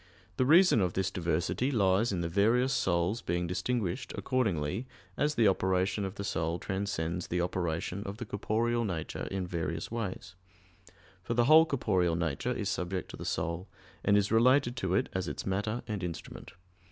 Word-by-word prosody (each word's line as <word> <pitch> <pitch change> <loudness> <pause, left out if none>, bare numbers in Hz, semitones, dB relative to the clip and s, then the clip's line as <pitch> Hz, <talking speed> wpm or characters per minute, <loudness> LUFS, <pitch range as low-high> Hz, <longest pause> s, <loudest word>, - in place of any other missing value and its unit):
The 130 - +2
reason 170 - +6
of 90 -2 0
this 95 0 -1
diversity 85 - 0
lies 105 -2 +2
in 90 -3 -1
the 85 - -1
various 115 +9 +2
souls 90 +5 +1
being 85 +1 -1
distinguished 95 +4 -2
accordingly 105 - -1 0.3
as 150 +1 0
the 115 -2 +4
operation 95 +1 +1
of 95 +1 -5
the 100 - -5
soul 80 -3 -1
transcends 90 -3 -3
the 90 - -1
operation 90 +1 -2
of 100 +1 -6
the 120 - -5
corporeal 115 +3 0
nature 85 -7 -4
in 95 -1 -2
various 85 -1 -3
ways; 105 -5 -4 0.9
for 115 +6 -3
the 120 0 +4
whole 160 +4 +7
corporeal 95 - +1
nature 80 - -2
is 105 -5 -2
subject 95 -1 -3
to - - -7
the - - -7
soul, 85 +4 -2 0.4
and 100 0 +4
is 100 0 +1
related 120 +2 +4
to 95 -5 0
it - - +2
as 95 0 -2
its - - -5
matter 105 +5 -2
and 105 -4 -3
instrument. 85 -3 -7
95 Hz, 175 wpm, -30 LUFS, 90-115 Hz, 0.9 s, whole